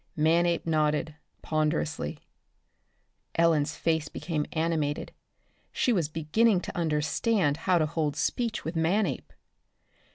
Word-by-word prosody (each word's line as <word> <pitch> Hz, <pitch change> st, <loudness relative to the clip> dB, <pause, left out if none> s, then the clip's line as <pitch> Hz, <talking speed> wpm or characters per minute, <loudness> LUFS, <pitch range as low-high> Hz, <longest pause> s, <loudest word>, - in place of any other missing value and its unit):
Manape 170 Hz, +2 st, +2 dB
nodded, 155 Hz, -1 st, +1 dB, 0.3 s
ponderously. 155 Hz, -, -1 dB, 1.2 s
Ellen's 165 Hz, -3 st, +2 dB
face 160 Hz, -2 st, 0 dB
became 155 Hz, -3 st, -3 dB
animated. 160 Hz, -3 st, -1 dB, 0.6 s
She 245 Hz, -, +1 dB
was 170 Hz, -8 st, 0 dB
beginning 180 Hz, +6 st, +2 dB
to -, -, -7 dB
understand 155 Hz, +2 st, +1 dB
how 180 Hz, -, +5 dB
to 155 Hz, -, +2 dB
hold 155 Hz, -2 st, -1 dB
speech 225 Hz, +8 st, -1 dB
with 160 Hz, +2 st, -4 dB
Manape. 180 Hz, +6 st, 0 dB
160 Hz, 105 wpm, -28 LUFS, 150-170 Hz, 1.2 s, how